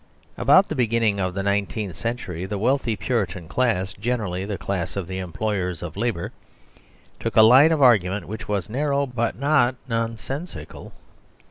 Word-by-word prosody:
About - - +5
the - - -3
beginning 115 -4 +1
of 95 -1 -2
the 100 - -2
nineteenth 100 -1 -1
century 105 -7 -4
the 105 - -3
wealthy 120 +1 +1
Puritan 100 -5 -2
class, 100 -6 0
generally 105 -5 -2
the 100 -1 -4
class 95 -3 -3
of 100 -3 -3
the 95 0 -4
employers 90 -2 -3
of 80 -2 -6
labour, 105 -5 -2 0.9
took - - -3
a 110 - +8
line 130 +8 +7
of 155 -3 +2
argument 105 -5 +3
which 110 +2 -7
was 100 -4 -1
narrow, 140 +4 0
but 125 -3 -2
not 135 -2 +2
nonsensical. 115 - -5
110 Hz, 155 wpm, -23 LUFS, 95-125 Hz, 0.9 s, a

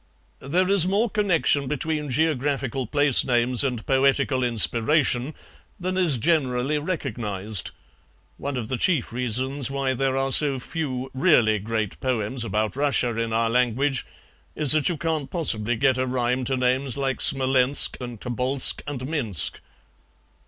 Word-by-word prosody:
"There 175 +7 0
is 195 -3 +6
more 205 +4 +1
connection 170 -9 +1
between 150 +1 -3
geographical 135 -3 -1
place 145 0 +3
names 125 0 +1
and 125 -5 -3
poetical 135 0 +1
inspiration 125 +4 +1 0.4
than 185 +1 -3
is 175 -8 +2
generally 140 0 0
recognized; 110 - -3 0.7
one 140 -2 -4
of 115 -3 -4
the 130 - -3
chief 150 -6 0
reasons 130 +3 -2
why 135 -1 -1
there 135 +1 -1
are 135 0 -1
so 140 -1 +3
few 130 -2 -5
really 130 - +3
great 110 0 -3
poems 125 -1 -2
about 110 0 -2
Russia 135 -4 0
in 115 0 -2
our 115 0 0
language 125 +2 0 0.5
is 150 -3 +4
that 155 +1 +4
you 175 - -2
can't 160 -3 -2
possibly 120 - 0
get 130 +2 +1
a 130 - 0
rhyme 125 0 -1
to 130 +1 0
names 130 +1 0
like 135 -1 -2
Smolensk 135 -1 +3
and 120 -3 -7
Tobolsk 125 +3 +1
and 135 -3 -5
Minsk." 120 - -2
130 Hz, 145 wpm, -24 LUFS, 120-145 Hz, 0.7 s, is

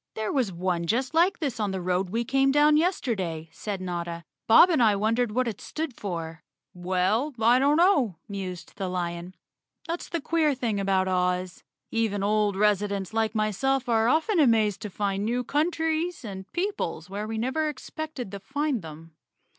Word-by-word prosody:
"There 220 -1 -2
was 250 -8 +1
one 175 -1 -2
just 250 - 0
like 345 +4 +3
this 275 -7 -3
on 210 -2 0
the 190 -1 -3
road 180 +1 -1
we 230 +4 -1
came 270 +2 +3
down 295 +1 +5
yesterday," 200 - -1
said 200 +3 -5
Notta. 170 -2 -4 0.2
"Bob 340 +11 +8
and 310 - +2
I 215 -3 +5
wondered 225 +3 +1
what 255 +3 0
it 215 -4 -5
stood 315 -3 -4
for." 165 -4 -5 0.3
"Well, 185 +10 0
I 235 +3 +5
don't 285 +3 +3
know," 290 - +3
mused 185 -4 -7
the 190 -2 -3
lion. 175 0 -4 0.5
"That's 335 +1 -4
the 340 - -2
queer 310 -1 +1
thing 230 -5 -1
about 190 -1 +1
Oz. 180 -1 -1 0.3
Even 220 -3 0
old 210 -1 +2
residents 200 -1 +1
like 225 -1 0
myself 245 +5 0
are 225 -1 +3
often 325 - +2
amazed 220 -7 +3
to 210 - -5
find 200 0 -2
new 240 +3 0
countries 320 +2 -1
and 190 -2 -8
peoples 345 - -3
where 205 +3 -5
we 225 0 -4
never 265 +7 0
expected 295 -4 -6
to 200 - -6
find 275 +3 -2
them. 160 0 -11
215 Hz, 175 wpm, -26 LUFS, 185-270 Hz, 0.5 s, Bob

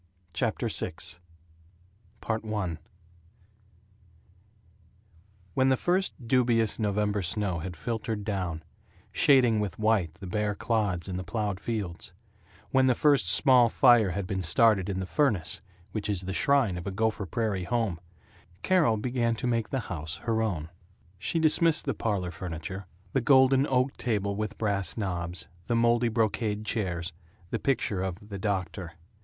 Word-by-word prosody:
CHAPTER 85 - -1
VI - - -1 1.3
I 110 -6 -2 2.8
WHEN 130 +5 +3
the 130 - +3
first 175 -8 -1
dubious 120 -3 +2
November 105 -1 0
snow 95 -1 -1
had 90 +2 -6
filtered 110 +1 -3
down, 90 -6 -3 0.5
shading 125 -6 +4
with 105 -5 -3
white 110 -7 +1
the 100 - -10
bare 105 +2 -1
clods 100 -6 -1
in 90 -1 -3
the 95 - -4
plowed 105 -2 -2
fields, 100 -7 -4 0.6
when 130 0 +4
the 125 - +4
first 140 - +3
small 125 +3 +5
fire 120 -5 +5
had 90 +2 -3
been 95 0 -2
started 100 +2 +3
in 95 - -2
the 95 - -3
furnace, 105 - 0 0.3
which 105 +1 -3
is 100 -3 +1
the 95 +1 -4
shrine 135 -7 +2
of 85 - -8
a - - -2
Gopher 105 0 -1
Prairie 100 -1 -1
home, 110 -6 -1 0.6
Carol 170 -12 +3
began 120 0 0
to 115 - -5
make 115 -2 0
the 135 - -1
house 80 -6 -4
her 115 -1 +1
own. 85 -8 -2 0.5
She 120 - -2
dismissed 160 0 +3
the - - 0
parlor 100 -5 -2
furniture 90 +2 -6 0.3
the 135 - +2
golden 130 +1 +5
oak 130 +1 +1
table 100 -4 -1
with 105 +1 -4
brass 100 -4 -1
knobs, 90 -4 -3 0.2
the 120 - +1
moldy 120 +1 +3
brocade 110 -1 0
chairs, 90 -6 -2 0.4
the 115 - -1
picture 110 -8 0
of 95 -2 -2
"The 100 -2 -6
Doctor." 95 -4 -3
105 Hz, 145 wpm, -28 LUFS, 95-120 Hz, 2.8 s, small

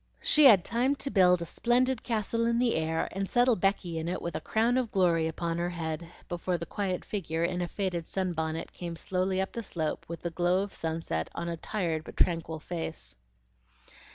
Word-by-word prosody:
She 305 -1 +6
had 205 -9 +8
time 250 +4 +1
to 280 0 -4
build 180 -3 +5
a - - -5
splendid 245 +6 +1
castle 230 0 0
in 235 0 +2
the 240 -1 +3
air 160 0 0
and 195 +1 -3
settle 245 0 +4
Becky 180 -3 0
in 160 - -4
it 180 +2 -1
with 170 -2 -4
a 155 - -2
crown 235 +7 +2
of 240 -4 -2
glory 170 -4 +2
on 170 0 -1
her 175 +1 0
head, 165 -1 -4 0.2
before 175 +1 -1
the 170 - -5
quiet 190 -2 -2
figure 165 -5 -2
in 180 +1 0
a 175 - -1
faded 180 -4 -2
sunbonnet 165 -4 -2
came 170 -1 -5
slowly 185 +2 -1
up 190 - -1
the 235 - -4
slope 160 -7 -3
with 170 0 -7
the 170 - -2
glow 175 +3 +2
of 200 - -7
sunset 160 - -2
on 170 - -3
a 170 - -2
tired 165 -3 -2
but - - -11
tranquil 165 -2 +1
face. 150 - -5
175 Hz, 205 wpm, -29 LUFS, 165-205 Hz, 0.2 s, had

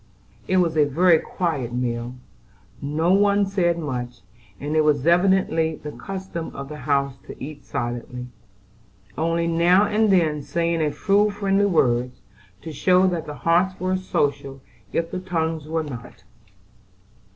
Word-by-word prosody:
It 185 - +2
was 170 -3 +2
a 150 - +6
very 165 +4 +4
quiet 140 -11 -3
meal, 120 0 -3 0.6
for - - -7
no 160 +5 +2
one 200 0 +3
said 180 -3 +1
much; 125 - -5 0.4
and 145 +2 -3
it 155 - +5
was 150 -3 +2
evidently 170 -2 +3
the 150 0 -8
custom 190 -3 -6
of 140 0 -7
the 150 - -7
house 140 -1 +1
to - - -8
eat 145 +2 -8
silently, 120 +1 -4 0.9
only 165 +1 0
now 170 +4 +4
and 210 +1 +2
then 160 -5 +2
saying 170 +2 -1
a 155 - +2
few 205 +5 +2
friendly 200 -1 +1
words, 125 -7 +1 0.4
to 160 - -6
show 185 +5 +3
that 165 -3 -3
the 150 - -6
hearts 180 +3 +2
were 185 +1 0
social 140 -7 -2 0.3
if 165 0 -1
the 185 - -3
tongues 165 -4 -2
were 160 0 -1
not. 125 -6 -9
165 Hz, 150 wpm, -23 LUFS, 140-185 Hz, 0.9 s, a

